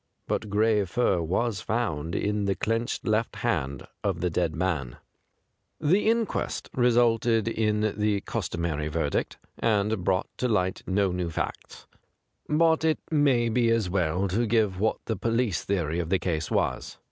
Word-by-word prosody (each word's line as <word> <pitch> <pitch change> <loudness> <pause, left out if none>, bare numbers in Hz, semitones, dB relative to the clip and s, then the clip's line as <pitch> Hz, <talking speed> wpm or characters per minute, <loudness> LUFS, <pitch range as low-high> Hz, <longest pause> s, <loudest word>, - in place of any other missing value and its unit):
But 105 - -2
gray 105 0 +3
fur 95 -1 +1
was 95 +5 -1
found 85 -9 -2
in 105 0 0
the 100 -1 +1
clenched 115 +2 -2
left 110 +1 0
hand 70 - -1 0.2
of 95 -4 0
the 90 +1 0
dead 85 -1 0
man. 80 -8 -2 0.8
187 - - -50
THE 150 - -1
GRAY 205 - +4
CAT 225 - +5
The - - 0
inquest 225 - -3
resulted 120 -2 +3
in 105 -2 +1
the 105 -1 +1
cus - - -3
tomary 80 -3 -2
verdict, 75 -2 -1 0.2
and 105 -3 +1
brought 90 0 +1
to 125 - +1
light 95 -5 0
no 95 0 +2
new 90 -1 -2
facts. 80 - -5 0.6
But 160 +1 +3
it 160 -1 +3
may 140 -6 +3
be 115 0 +2
as 115 -6 +1
well 90 +1 +1
to 115 +6 +1
give 105 -4 +1
what 110 +2 +1
the 110 - -1
police 115 -1 0
theory 85 -4 -1
of 85 -2 -3
the 95 - +3
case 80 -3 -2
was. - - -1
105 Hz, 170 wpm, -27 LUFS, 90-115 Hz, 0.8 s, CAT